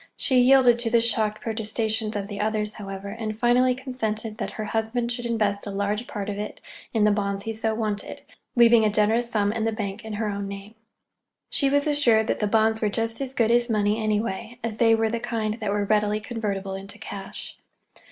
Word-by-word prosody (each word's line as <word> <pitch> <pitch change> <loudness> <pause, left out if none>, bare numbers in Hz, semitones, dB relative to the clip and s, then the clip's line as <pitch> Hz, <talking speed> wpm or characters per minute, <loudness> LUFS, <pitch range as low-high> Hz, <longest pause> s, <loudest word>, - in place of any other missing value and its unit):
She 260 -3 +3
yielded 250 -2 +5
to 235 -1 -1
the 235 0 +4
shocked 220 -2 0
protestations 220 0 -2
of 200 -1 -2
the 205 -1 -6
others, 215 0 -1
however, 195 -1 -7
and 215 0 -5
finally 250 +2 +3
consented 225 -4 -4
that - - -4
her 215 - -4
husband 225 +3 -1
should 240 0 -3
invest 210 -3 -1
a - - -3
large 205 +4 -2
part 205 -8 -5
of 205 -1 -4
it 210 - -5 0.3
in 220 -3 +1
the 210 - +5
bonds 200 -1 -1
he 225 - -3
so 220 0 -1
wanted, 215 -2 -3 0.3
leaving 235 -2 +6
a 215 - +3
generous 220 +3 +2
sum 205 -3 +1
in 225 -1 -2
the 225 - +1
bank 210 0 -5
in 220 -1 -6
her 215 +1 -2
own 200 -1 -3
name. 200 +2 -8 0.8
She 275 - +3
was 285 +1 +2
assured 255 -7 +6
that - - -1
the 210 - +1
bonds 220 +1 +2
were 215 - +2
just 225 +3 -2
as 265 -1 -4
good 230 -3 +2
as 240 +1 +3
money, 210 0 +1
anyway, 215 +1 -2
as 225 -2 -3
they 225 -1 +5
were 225 0 +1
the 235 - -1
kind 225 -2 -2
that 215 -3 -2
were 205 0 0
readily 210 0 +1
convertible 205 -4 -4
into 195 +1 -7
cash. 195 -1 -7
220 Hz, 210 wpm, -25 LUFS, 210-235 Hz, 0.8 s, leaving